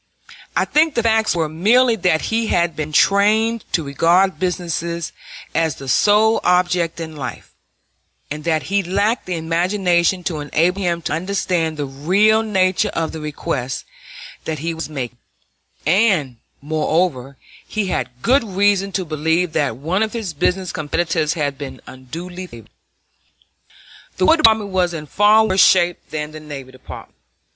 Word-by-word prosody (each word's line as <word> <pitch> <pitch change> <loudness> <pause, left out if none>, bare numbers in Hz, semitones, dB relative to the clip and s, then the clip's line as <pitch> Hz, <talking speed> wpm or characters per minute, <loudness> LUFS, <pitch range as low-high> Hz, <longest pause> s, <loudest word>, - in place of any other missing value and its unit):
I - - +2
think 310 0 +2
the 235 - +1
facts 220 -3 +2
were 165 -2 0
merely 225 +10 +3
that 175 -4 +1
he 225 0 +1
had 170 -3 +1
been 155 0 -4
trained 215 +6 +3
to 165 - +1
regard 170 +7 +2
business 175 -3 -2 0.7
as 160 -2 0
the 135 - -10
sole 210 - +4
object 180 -2 +1
in 160 -1 -6
life, 130 -5 -7 0.8
and 150 +1 -5
that 160 -1 0
he 200 +1 0
lacked 200 +6 -1
the 180 - -2
imagination 175 +2 +1
to 165 -3 -3
enable 170 +6 0
him 170 -2 -1
to - - -2
understand 175 -2 -1
the 145 - -2
real 190 +11 +2
nature 190 -4 +1
of 165 -1 -1
the 160 - -7
request 140 -4 -4 0.6
that 160 -1 -3
he 165 +3 -3
was 160 -1 -6
making; 125 -5 -6 0.7
and, 165 - +2 0.3
moreover, 150 -3 -1 0.3
he 215 -2 -2
had 125 -7 -4
good 265 +2 +3
reason 200 -1 +1
to 185 - -1
believe 160 +2 0
that 140 -7 0
one 170 +9 -1
of 220 -1 -1
his 220 -8 -4
business 180 +3 -1
competitors 160 +1 -1
had 145 -3 -2
been 140 -2 -7
unduly 175 +8 -8
favored. 115 - -14 1.5
The 185 - +2
War 330 - +5
Department 220 -7 +4
was 180 -2 0
in 155 -2 -6
far 210 +7 +4
worse 190 -2 +4
shape 175 -2 +4
than 150 0 -4
the 155 - -9
Navy 140 -4 -9
Department. 130 - -12
175 Hz, 155 wpm, -19 LUFS, 155-195 Hz, 1.5 s, War